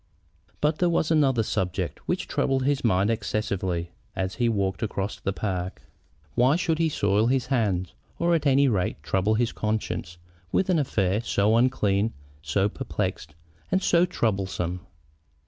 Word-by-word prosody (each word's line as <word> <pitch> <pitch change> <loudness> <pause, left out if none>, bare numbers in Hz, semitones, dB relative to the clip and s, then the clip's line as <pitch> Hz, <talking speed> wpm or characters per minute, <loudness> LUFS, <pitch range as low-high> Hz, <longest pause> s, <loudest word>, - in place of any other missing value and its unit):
But 150 +1 +1
there 180 - +3
was 165 -1 +1
another 135 -7 +3
subject 90 -4 -2
which - - -1
troubled 135 -1 0
his 140 0 +1
mind 100 -2 +3
excessively 95 -6 -2 0.2
as 95 0 -2
he 120 -1 +2
walked 100 -4 -1
across 100 -2 -3
the 100 - -1
park. 95 -2 -3 0.5
Why 125 - +4
should 165 -2 0
he 165 -1 +3
soil 105 -4 +2
his 130 0 +1
hands, 100 - 0 0.2
or, 170 0 +2
at 155 -3 +2
any 140 +1 +5
rate, 100 -8 -1
trouble 95 +3 +1
his 115 +1 +1
conscience, 105 -5 -3 0.3
with 190 0 +2
an 170 - +3
affair 105 -7 +1
so 110 -1 +2
unclean, 110 -4 +2 0.3
so 95 +7 +1
perplexed, 75 -6 -4 0.4
and 190 +1 +2
so 175 +1 +4
troublesome? 95 - -1
110 Hz, 150 wpm, -26 LUFS, 95-135 Hz, 0.5 s, any